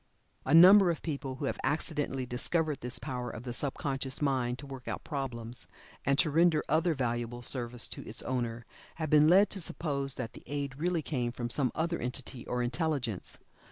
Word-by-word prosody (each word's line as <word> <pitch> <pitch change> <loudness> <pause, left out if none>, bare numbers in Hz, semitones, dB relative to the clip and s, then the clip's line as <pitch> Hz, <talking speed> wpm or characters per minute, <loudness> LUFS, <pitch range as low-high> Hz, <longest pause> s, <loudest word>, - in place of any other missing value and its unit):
A - - +1
number 185 +3 +9
of 165 - -2
people 140 -4 -3
who 135 - -4
have - - -2
accidentally 145 -4 -1
discovered 150 +4 -1
this 125 +1 -3
power 125 -3 -4
of 110 - -7
the 125 -2 -5
sub 135 +2 -1
conscious 135 -1 -2
mind 130 -4 0
to 140 - -9
work 135 -2 -9
out - - -4
problems, 125 -5 -4 0.4
and 140 +1 +2
to 155 - +3
render 165 0 +4
other 160 +1 +2
valuable 120 -1 -2
service 120 -1 -1
to - - -7
its 110 - -3
owner, 120 -2 -2 0.3
have 155 -2 -3
been 150 0 +7
led 195 +4 +6
to 195 - -3
suppose 140 -5 -1
that 120 -3 -5
the - - -11
aid 140 -1 -4
really 170 -1 0
came 125 -6 -1
from 120 -1 -4
some 130 -3 +1
other 170 +1 -1
entity 125 0 -5
or 125 0 -1
intelligence. 125 - -2
135 Hz, 195 wpm, -31 LUFS, 125-155 Hz, 0.4 s, number